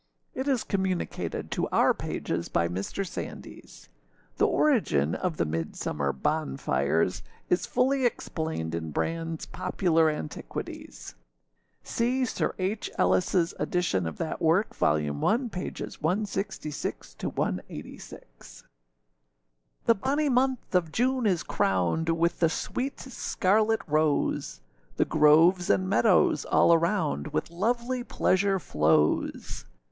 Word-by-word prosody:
It 260 Hz, +2 st, -3 dB
is 265 Hz, -5 st, +1 dB
communicated 190 Hz, -2 st, -2 dB
to -, -, -1 dB
our -, -, +4 dB
pages -, -, -4 dB
by 85 Hz, -, +1 dB
Mr. 95 Hz, -, -3 dB
Sandys. -, -, -9 dB, 0.5 s
The -, -, +4 dB
origin 85 Hz, -, +2 dB
of 175 Hz, -4 st, -2 dB
the -, -, +1 dB
Midsummer 75 Hz, -3 st, -2 dB
bonfires 70 Hz, +5 st, 0 dB, 0.3 s
is 180 Hz, -, +2 dB
fully 265 Hz, +1 st, +1 dB
explained 160 Hz, -, -2 dB
in 80 Hz, -2 st, -3 dB
Brandâs 165 Hz, -, -3 dB
Popular 165 Hz, -3 st, +2 dB
Antiquities. 80 Hz, -, -6 dB, 0.7 s
See 255 Hz, +3 st, 0 dB
Sir -, -, -2 dB
H. 195 Hz, +3 st, -2 dB
Ellisâs 175 Hz, -2 st, +2 dB
edition 100 Hz, -, 0 dB
of 80 Hz, -, -6 dB
that 165 Hz, -, -4 dB
work, 170 Hz, +7 st, +2 dB
vol. 75 Hz, -, +2 dB
i. -, -, -1 dB
pp. 180 Hz, -, -2 dB
166â186.] 155 Hz, -, -4 dB, 1.2 s
THE 230 Hz, -, +6 dB
bonny 280 Hz, +7 st, 0 dB
month 255 Hz, -2 st, +1 dB
of 175 Hz, -4 st, +2 dB
June 250 Hz, +2 st, +1 dB
is 180 Hz, -5 st, +1 dB
crowned 95 Hz, -, 0 dB
With 165 Hz, +1 st, +1 dB
the 165 Hz, -, +4 dB
sweet 260 Hz, +11 st, -3 dB
scarlet 220 Hz, -3 st, +1 dB
rose; 150 Hz, -, 0 dB, 0.3 s
The -, -, +2 dB
groves 165 Hz, +4 st, +5 dB
and 185 Hz, -, +2 dB
meadows 195 Hz, 0 st, +3 dB
all 170 Hz, -, +4 dB
around 165 Hz, -, +1 dB
With 75 Hz, -, -3 dB
lovely 240 Hz, +7 st, -1 dB
pleasure 195 Hz, -4 st, +1 dB
flows. 75 Hz, -, 0 dB
170 Hz, 110 wpm, -27 LUFS, -, 1.2 s, THE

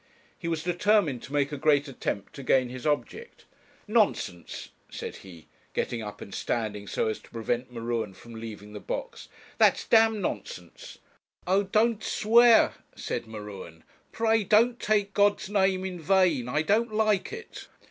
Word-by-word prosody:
He 170 Hz, -, -7 dB
was 165 Hz, -1 st, -2 dB
determined 175 Hz, -, +2 dB
to -, -, -11 dB
make 145 Hz, 0 st, +1 dB
a 145 Hz, -, -4 dB
great 145 Hz, 0 st, +3 dB
attempt 105 Hz, -6 st, -4 dB
to 140 Hz, -, -8 dB
gain 130 Hz, -1 st, +2 dB
his 130 Hz, +2 st, -5 dB
object. 445 Hz, -, -3 dB, 0.4 s
'Nonsense,' 205 Hz, -, 0 dB, 0.2 s
said -, -, -7 dB
he, 85 Hz, -4 st, -14 dB, 0.3 s
getting 120 Hz, -2 st, -2 dB
up 105 Hz, -1 st, -8 dB
and 100 Hz, -, -9 dB
standing 105 Hz, -3 st, -3 dB
so -, -, -1 dB
as 110 Hz, -, -2 dB
to -, -, -19 dB
prevent 120 Hz, +2 st, -3 dB
M'Ruen 115 Hz, -4 st, -3 dB
from 120 Hz, +4 st, -13 dB
leaving 110 Hz, -2 st, -9 dB
the 105 Hz, -, -6 dB
box; -, -, -6 dB, 0.3 s
'that's -, -, +4 dB
d 225 Hz, -1 st, +6 dB
nonsense.' 175 Hz, -, -6 dB, 0.5 s
'Oh! 190 Hz, +2 st, +3 dB
don't 215 Hz, +3 st, +1 dB
swear,' 230 Hz, +1 st, +5 dB, 0.2 s
said -, -, -4 dB
M'Ruen 105 Hz, -7 st, -9 dB, 0.3 s
'pray 225 Hz, -1 st, +2 dB
don't 230 Hz, +5 st, +3 dB
take 205 Hz, -2 st, +1 dB
God's 205 Hz, 0 st, +2 dB
name 190 Hz, -2 st, +2 dB
in 180 Hz, -2 st, -5 dB
vain; 170 Hz, -8 st, +2 dB
I 150 Hz, +5 st, +1 dB
don't 220 Hz, +6 st, +1 dB
like 215 Hz, -2 st, +1 dB
it.' 460 Hz, +1 st, -9 dB
155 Hz, 160 wpm, -27 LUFS, -, 0.5 s, d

